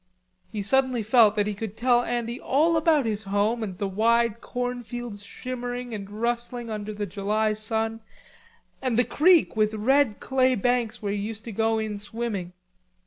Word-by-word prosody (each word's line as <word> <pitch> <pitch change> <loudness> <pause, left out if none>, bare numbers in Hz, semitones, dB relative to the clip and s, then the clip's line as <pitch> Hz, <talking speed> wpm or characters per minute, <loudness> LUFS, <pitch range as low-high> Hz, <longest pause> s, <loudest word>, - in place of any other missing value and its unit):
He 210 -2 -3
suddenly 260 +1 +2
felt 220 -1 +5
that 205 -1 +2
he 210 - -2
could 215 +1 -6
tell 245 0 +3
Andy 240 0 -3
all 315 +5 +2
about 315 -4 +3
his 215 -2 -1
home 205 +4 +1
and 195 -5 -4
the 200 0 -2
wide 230 +3 +2
corn 245 0 -3
fields 240 -3 -7
shimmering 245 +2 -5
and 200 -2 -6
rustling 235 +2 -3
under 210 0 -4
the 205 0 -3
July 210 +3 0
sun, 220 +1 -2 0.8
and 255 -4 0
the 245 - +5
creek 340 -2 +4
with 215 0 +1
red 255 +1 +2
clay 260 -1 +2
banks 240 0 0
where 200 -1 -1
he 205 - -2
used 220 +2 -4
to 230 - -5
go 225 +2 +1
in 215 -2 -3
swimming. 205 -4 -4
225 Hz, 175 wpm, -25 LUFS, 210-245 Hz, 0.8 s, felt